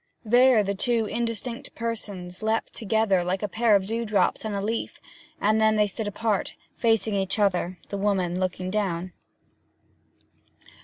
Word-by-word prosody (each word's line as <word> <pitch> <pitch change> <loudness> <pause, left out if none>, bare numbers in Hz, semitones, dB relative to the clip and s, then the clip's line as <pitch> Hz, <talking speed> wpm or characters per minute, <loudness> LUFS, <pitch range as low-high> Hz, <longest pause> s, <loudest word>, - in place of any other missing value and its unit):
There 245 0 +5
the 200 0 -1
two 230 +2 +1
indistinct 235 +3 -4
persons 205 -6 -5
leapt 220 +1 -1
together 220 -4 +1
like 185 +3 -2
a - - +1
pair 220 +1 +3
of 195 -1 +2
dewdrops 220 -1 0
on 215 -2 -3
a - - -1
leaf; 220 +3 -3 0.4
and 215 +1 +2
then 220 0 +4
they 210 0 +4
stood 205 +2 -4
apart, 205 0 -1 0.2
facing 225 -2 +1
each 195 0 -1
other, 185 -3 +1
the 200 - -3
woman 185 -3 0
looking 185 0 -2
down. 185 -4 -2
210 Hz, 150 wpm, -26 LUFS, 190-225 Hz, 0.4 s, There